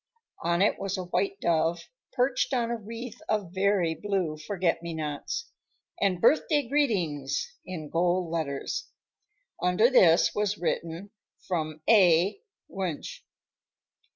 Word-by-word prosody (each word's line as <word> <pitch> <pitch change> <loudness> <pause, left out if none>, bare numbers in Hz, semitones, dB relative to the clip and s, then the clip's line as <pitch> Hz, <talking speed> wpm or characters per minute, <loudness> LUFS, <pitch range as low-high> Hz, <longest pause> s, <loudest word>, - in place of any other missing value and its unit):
On 170 +2 +2
it 210 - +2
was 195 -1 -2
a 185 - -3
white 390 - -1
dove, 165 0 +1 0.3
perched 255 +1 +1
on 235 -1 0
a - - 0
wreath 230 +2 -8
of 205 -5 -1
very 190 -3 +2
blue 185 -3 -2
forget 170 +1 -1
me 170 -1 -5
nots, 155 - -4 0.5
and 190 -3 +2
"Birthday 295 - +3
Greetings" 205 - 0
in 170 -5 -6
gold 175 +2 0
letters. 160 - -3 0.7
Under 180 +8 +3
this 170 -9 +5
was 210 0 0
written, 170 +2 -3 0.4
"From 155 -4 -2
A. 190 - +5 0.3
Wunsch." 185 -6 -5
185 Hz, 125 wpm, -28 LUFS, 165-220 Hz, 0.7 s, this